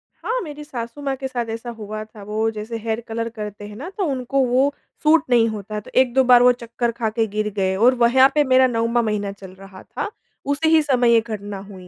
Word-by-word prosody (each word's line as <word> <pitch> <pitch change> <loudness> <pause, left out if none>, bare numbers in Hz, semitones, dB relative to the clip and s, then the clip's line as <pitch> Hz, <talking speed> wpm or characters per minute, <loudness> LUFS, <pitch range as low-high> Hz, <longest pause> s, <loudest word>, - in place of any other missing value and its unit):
हाँ, - - -2
मेरी 300 -2 -8
सासु-माँ 270 +1 -5
के 265 0 -4
साथ 245 -2 -3
ऐसा 230 +2 -5
हुआ 215 0 -6
था, 215 -1 -14
वो 215 +2 -1
जैसे 220 +2 -6
हेयर 225 0 -3
कलर 230 +1 -3
करते 210 -2 -7
हैं 210 - -10
ना 280 +11 -7
तो 405 - 0
उनको 265 +1 -1
वो 260 +3 +2 0.3
सूट 310 0 +5
नहीं 235 -2 +4
होता 215 -1 -6
है। 210 - -3
तो - - -15
1-2 260 0 +4
बार 245 -1 +6
वो 250 - +7
चक्कर 235 0 -3
खा 230 -1 -2
के 225 +1 0
गिर 215 0 0
गए 190 -1 +1
और 240 +6 +4
व 235 - +7
यहाँ 265 +1 +7
पे 300 - +4
मेरा 260 -1 +4
9वाँ 230 0 +1
महीना 210 -2 -2
चल 195 -2 -12
रहा 195 -1 -12
था, - - -5 0.4
उसी 285 +3 +1
ही 320 -1 +5
समय 250 -5 +3
ये 230 - +5
घटना 205 -3 -6
हुई। 185 -2 -12
235 Hz, 240 wpm, -21 LUFS, 215-260 Hz, 0.4 s, वो